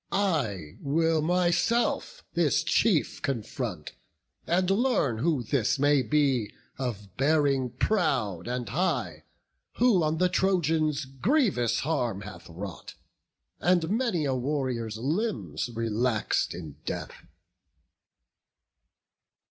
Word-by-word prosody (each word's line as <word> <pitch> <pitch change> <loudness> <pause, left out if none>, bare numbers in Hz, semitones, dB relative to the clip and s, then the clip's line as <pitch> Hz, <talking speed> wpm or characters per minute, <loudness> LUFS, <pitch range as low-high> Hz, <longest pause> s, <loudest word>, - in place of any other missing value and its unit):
I 125 - -1
will 160 +2 +1
myself 180 - +1
this - - +2
chief 185 -9 +2
confront, 115 - -3 0.6
and 180 +2 +2
learn 200 - +1
Who 150 -2 +1
this 120 +2 +1
may 145 0 +4
be 135 -6 +1 0.3
of 105 -7 -5
bearing 140 -2 +2
proud 130 - 0
and 125 -1 -3
high, 180 +8 -1 0.5
Who 235 -7 +4
on 155 0 +1
the 180 +2 +3
Trojans 160 -6 +1
grievous 135 - +1
harm 125 -10 -1
hath 95 -5 -10
wrought, 90 +2 -8 0.6
And 175 -1 +2
many 220 - +1
a 135 - +1
warrior's 125 -4 -2
limbs 120 - -2
relax'd 115 -2 0
in 80 -5 -8
death." - - -6
140 Hz, 100 wpm, -28 LUFS, 115-175 Hz, 0.6 s, may